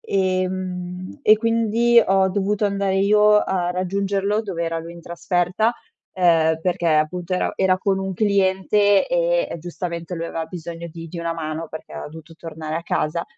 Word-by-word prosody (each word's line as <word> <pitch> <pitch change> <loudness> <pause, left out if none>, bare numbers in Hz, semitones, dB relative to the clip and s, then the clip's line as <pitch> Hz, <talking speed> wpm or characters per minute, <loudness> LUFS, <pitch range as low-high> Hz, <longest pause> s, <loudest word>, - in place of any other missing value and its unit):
ehm, 185 0 -2
e 215 -4 +6
quindi 230 +1 +3
ho 190 0 +3
dovuto 200 +2 0
andare 200 -1 0
io 210 +2 +5
a 180 -3 -1
raggiungerlo 200 +3 -1
dov'era 170 -5 -3
lui 165 +1 -8
in 170 - -11
trasferta, 175 +5 0 0.4
ehm, 165 -3 +3
perché 175 0 -1
appunto, 165 +3 +1
era 180 - -1
era 185 -1 +2
con 190 0 0
un 190 0 -3
cliente 200 +1 +2
e - - +1 0.2
e - - -5
giustamente, 170 +1 -5
lui 165 -1 -4
aveva 165 -1 -4
bisogno 170 0 -7
di 165 0 -8
di 170 - -7
una 170 0 -2
mano 160 0 -5
perché 160 - -10
era - - -6
dovuto 160 +1 -12
tornare 160 -1 -6
a 165 - -4
casa. 170 0 -1
185 Hz, 165 wpm, -22 LUFS, 170-200 Hz, 0.4 s, e